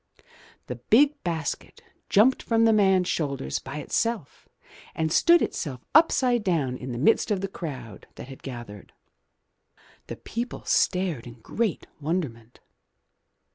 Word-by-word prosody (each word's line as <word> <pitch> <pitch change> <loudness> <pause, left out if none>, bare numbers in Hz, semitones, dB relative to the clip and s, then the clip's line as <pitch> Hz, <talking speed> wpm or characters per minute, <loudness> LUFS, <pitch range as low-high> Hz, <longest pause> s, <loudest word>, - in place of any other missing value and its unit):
The 125 - -6
big 280 - +3
basket 165 -4 -4 0.3
jumped 230 +6 +4
from 230 -1 +2
the 225 - +5
man's 190 -3 +3
shoulders 140 - -2
by 135 +2 -8
itself 220 - -3 0.5
and 160 -1 -1
stood 340 - +5
itself 130 -5 -4
upside 255 -7 +4
down 155 -10 0
in 125 0 -7
the 120 - -4
midst 160 - +3
of 200 -3 0
the 195 - -2
crowd 130 - -8
that - - -9
had 135 -1 -11
gathered. 120 -6 -9 1.1
The - - -6
people 235 +2 -5
stared 180 -10 +1
in 120 - -10
great 220 - -2
wonderment. 140 -8 -4
165 Hz, 135 wpm, -26 LUFS, -, 1.1 s, the